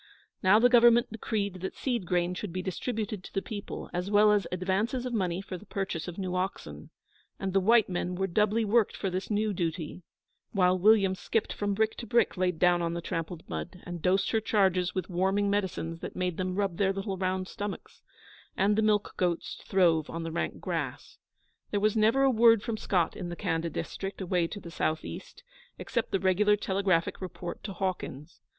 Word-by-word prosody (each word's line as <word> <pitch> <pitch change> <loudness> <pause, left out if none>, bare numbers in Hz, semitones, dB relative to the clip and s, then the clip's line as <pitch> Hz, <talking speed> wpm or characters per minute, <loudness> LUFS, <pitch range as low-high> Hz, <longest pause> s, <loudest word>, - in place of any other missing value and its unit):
Now 190 +2 +6
the 235 +3 +6
Government 240 -1 +5
decreed 200 -4 -3
that 190 - -4
seed 240 -9 -2
grain 175 0 +1
should 185 +1 -5
be 185 +2 -4
distributed 210 +1 -3
to - - -10
the 195 - 0
people, 205 -2 -6
as 180 +2 -2
well 210 +1 +5
as 205 -4 +2
advances 195 +8 -1
of 250 - -3
money 185 -4 0
for 185 -2 -7
the 210 - -15
purchase 190 -5 -3
of 175 - -7
new 185 -2 -3
oxen; 185 +2 -4 0.5
and 195 -2 -3
the 195 - +4
white 220 +3 +5
men 180 0 -2
were 190 +1 0
doubly 210 +4 +2
worked 215 +1 +2
for 195 - -2
this 185 +2 -3
new 210 0 +1
duty, 170 -1 -3 0.5
while 185 -3 +4
William 195 0 +4
skipped 210 +4 -1
from 205 -1 -1
brick 220 +1 +1
to 235 - -7
brick 235 -1 +2
laid 180 -2 0
down 175 +1 +4
on 170 0 -1
the 170 - -3
trampled 165 0 -4
mud, 180 +1 -6
and 175 -2 -6
dosed 190 +3 +2
her 225 - +2
charges 190 -4 +2
with 185 -3 -2
warming 195 +3 +1
medicines 185 -5 -2
that - - -7
made 180 -2 -2
them 185 -1 -2
rub 195 -4 -1
their 195 -1 +2
little 195 0 -3
round 185 0 -1
stomachs; 205 -1 -7 0.6
and 200 +2 +3
the 220 - +2
milch 210 -1 +3
goats 175 -3 -1
throve 170 -5 +3
on 165 0 -4
the 165 - -4
rank 170 - -3
grass. - - -4 0.5
There 205 - 0
was 215 +1 +2
never 225 +5 +4
a 270 - +5
word 230 -2 +5
from 230 - -2
Scott 180 -5 0
in 175 - -5
the 175 - -5
Khanda 170 -3 -1
district, 195 +5 -5
away 180 -2 0
to 205 - -7
the 170 -3 -10
south 155 -1 -1
east, - - -9 0.3
except 235 -3 -2
the 195 - +1
regular 190 +3 +3
telegraphic 190 -4 0
report 180 -1 -6
to 200 - -4
Hawkins. 175 -5 -4
190 Hz, 200 wpm, -29 LUFS, 180-210 Hz, 0.6 s, Now